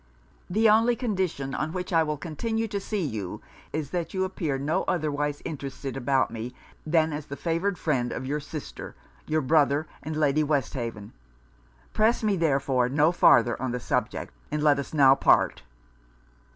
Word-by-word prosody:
The 220 Hz, +5 st, +3 dB
only 225 Hz, +3 st, +4 dB
condition 185 Hz, -, -2 dB
on 155 Hz, +3 st, -2 dB
which 180 Hz, 0 st, -4 dB
I 165 Hz, -, +5 dB
will 150 Hz, -1 st, -1 dB
continue 220 Hz, +9 st, -2 dB
to 200 Hz, -, -2 dB
see 200 Hz, -2 st, -2 dB
you 105 Hz, -9 st, -4 dB, 0.3 s
is, 150 Hz, -2 st, -3 dB
that 170 Hz, 0 st, -3 dB
you 190 Hz, -, +1 dB
appear 170 Hz, -7 st, -2 dB
no 145 Hz, +5 st, 0 dB
otherwise 145 Hz, -3 st, -1 dB
interested 140 Hz, -3 st, -5 dB
about 135 Hz, 0 st, +1 dB
me, 120 Hz, +2 st, -6 dB, 0.3 s
than 160 Hz, -1 st, +2 dB
as 150 Hz, 0 st, -5 dB
the 140 Hz, -, -6 dB
favoured 175 Hz, +5 st, -1 dB
friend 125 Hz, -6 st, 0 dB
of -, -, -4 dB
your 145 Hz, +3 st, -1 dB
sister, 150 Hz, 0 st, -8 dB, 0.3 s
your 155 Hz, 0 st, +1 dB
brother, 145 Hz, +1 st, +3 dB, 0.2 s
and 155 Hz, +2 st, -5 dB
Lady 150 Hz, -1 st, +2 dB
Westhaven. 120 Hz, -8 st, -2 dB, 0.8 s
Press 225 Hz, +2 st, +2 dB
me, 210 Hz, -2 st, +2 dB
therefore, 135 Hz, -6 st, +1 dB
no 150 Hz, +4 st, +3 dB
farther 120 Hz, -8 st, +4 dB
on 130 Hz, -2 st, -2 dB
the 125 Hz, -, -2 dB
subject, -, -, -2 dB, 0.2 s
and 150 Hz, 0 st, -2 dB
let 145 Hz, -2 st, +4 dB
us 140 Hz, -, -5 dB
now 140 Hz, -3 st, +6 dB
part.' -, -, +3 dB
150 Hz, 165 wpm, -26 LUFS, 135-175 Hz, 0.8 s, now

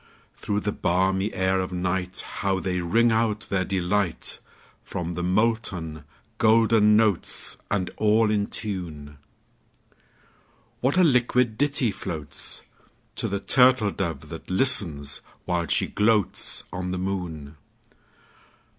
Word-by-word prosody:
Through 105 Hz, 0 st, -3 dB
the 105 Hz, -, -1 dB
balmy 95 Hz, +4 st, 0 dB
air 95 Hz, 0 st, 0 dB
of 95 Hz, -, -2 dB
nightHow 95 Hz, +1 st, -2 dB
they 90 Hz, -1 st, -2 dB
ring 115 Hz, +7 st, +2 dB
out 110 Hz, -1 st, +1 dB
their 95 Hz, -1 st, +1 dB
delight! 95 Hz, -1 st, -1 dB, 0.4 s
From 85 Hz, -1 st, -5 dB
the 90 Hz, -, -4 dB
molten 90 Hz, -6 st, -1 dB, 0.3 s
golden 110 Hz, -1 st, +4 dB
notes, 110 Hz, -5 st, 0 dB
And 95 Hz, -3 st, -1 dB
all 110 Hz, 0 st, +3 dB
in 105 Hz, -1 st, 0 dB
tune, 80 Hz, -9 st, -6 dB, 1.6 s
What 130 Hz, +7 st, +1 dB
a 185 Hz, -, +6 dB
liquid 125 Hz, -5 st, +2 dB
ditty 140 Hz, -3 st, +2 dB
floatsTo 80 Hz, -7 st, -7 dB
the 100 Hz, -, -2 dB
turtle 125 Hz, -3 st, +4 dB
dove 80 Hz, -7 st, -4 dB
that 80 Hz, -, -9 dB
listens, 90 Hz, -, +4 dB, 0.2 s
while 85 Hz, -1 st, -1 dB
she -, -, +2 dB
gloatsOn 105 Hz, -3 st, -1 dB
the 90 Hz, -, -2 dB
moon! 85 Hz, -6 st, -5 dB
95 Hz, 110 wpm, -25 LUFS, 90-110 Hz, 1.6 s, a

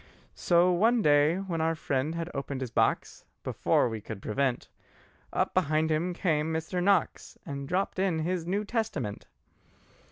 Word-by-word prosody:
So 175 Hz, +1 st, +3 dB
one 220 Hz, +6 st, +3 dB
day 145 Hz, +2 st, +4 dB
when 185 Hz, -4 st, -3 dB
our 165 Hz, +1 st, +1 dB
friend 145 Hz, +1 st, -1 dB
had 165 Hz, 0 st, -3 dB
opened 140 Hz, -1 st, -4 dB
his 125 Hz, -3 st, -4 dB
box, -, -, 0 dB, 0.2 s
Before -, -, +1 dB
we 110 Hz, -2 st, -5 dB
could 110 Hz, -1 st, -7 dB
prevent, 125 Hz, +5 st, -1 dB, 0.6 s
Up -, -, 0 dB
behind 160 Hz, -2 st, +1 dB
him 165 Hz, +4 st, 0 dB
came 160 Hz, -3 st, 0 dB
Mr. 160 Hz, +3 st, -2 dB
Knox 195 Hz, -2 st, +1 dB
And 140 Hz, -3 st, -5 dB
dropped 185 Hz, +1 st, -1 dB
in 190 Hz, -4 st, +1 dB
his 170 Hz, +1 st, -2 dB
New 200 Hz, +4 st, -1 dB
Testament. 200 Hz, -, -3 dB
160 Hz, 155 wpm, -28 LUFS, 140-180 Hz, 0.6 s, day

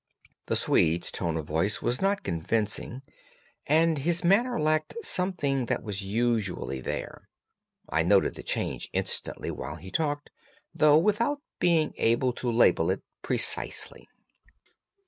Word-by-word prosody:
The -, -, 0 dB
Swede's 85 Hz, +2 st, +2 dB
tone 85 Hz, -3 st, -2 dB
of 80 Hz, -, -4 dB
voice 80 Hz, +8 st, 0 dB
was 120 Hz, +1 st, 0 dB
not 200 Hz, +1 st, +1 dB
convincing, 105 Hz, +8 st, -2 dB, 0.6 s
and 160 Hz, +1 st, +3 dB
his 170 Hz, +5 st, +1 dB
manner 215 Hz, +7 st, +3 dB
lacked 155 Hz, 0 st, 0 dB
something 145 Hz, -, 0 dB
that -, -, -1 dB
was 105 Hz, -2 st, -4 dB
usually 100 Hz, -, -1 dB
there. -, -, -6 dB, 0.6 s
I 75 Hz, +4 st, +1 dB
noted 95 Hz, +4 st, +3 dB
the -, -, -9 dB
change -, -, -3 dB
instantly -, -, -3 dB
while 75 Hz, -, -6 dB
he 90 Hz, +3 st, -11 dB
talked, 145 Hz, +1 st, -1 dB, 0.4 s
though 150 Hz, 0 st, +5 dB
without 230 Hz, -, +1 dB, 0.2 s
being 165 Hz, -3 st, +2 dB
able 120 Hz, +2 st, +2 dB
to 120 Hz, 0 st, -2 dB
label 115 Hz, +1 st, +4 dB
it -, -, -1 dB, 0.2 s
precisely. -, -, 0 dB
125 Hz, 130 wpm, -27 LUFS, 95-165 Hz, 0.6 s, though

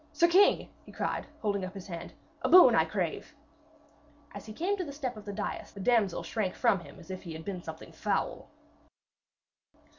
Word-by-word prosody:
'Sir 340 Hz, -, +4 dB
king!' 375 Hz, +4 st, +5 dB, 0.2 s
he -, -, -14 dB
cried, -, -, -3 dB, 0.2 s
holding 200 Hz, -2 st, 0 dB
up 185 Hz, +1 st, -6 dB
his 195 Hz, -, -8 dB
hand, 170 Hz, -4 st, -7 dB, 0.3 s
'a -, -, 0 dB
boon 365 Hz, 0 st, +9 dB
I -, -, +4 dB
crave!' -, -, -3 dB, 1.0 s
As 200 Hz, -, -9 dB
he -, -, -7 dB
came 355 Hz, -, -1 dB
to 370 Hz, -, -2 dB
the 295 Hz, -, -6 dB
step 270 Hz, -4 st, -4 dB
of 215 Hz, -, -11 dB
the 205 Hz, -, -4 dB
dais 205 Hz, +1 st, -5 dB
the 200 Hz, -, -10 dB
damsel 210 Hz, -3 st, +2 dB
shrank 205 Hz, -5 st, -2 dB
from 235 Hz, -6 st, +3 dB
him 170 Hz, -, -13 dB
as 180 Hz, -, -10 dB
if 185 Hz, -, -6 dB
he 170 Hz, -3 st, -7 dB
had 160 Hz, 0 st, -8 dB
been 190 Hz, -3 st, -4 dB
something 160 Hz, -1 st, -9 dB
foul. -, -, -2 dB
205 Hz, 200 wpm, -30 LUFS, 185-250 Hz, 1.0 s, boon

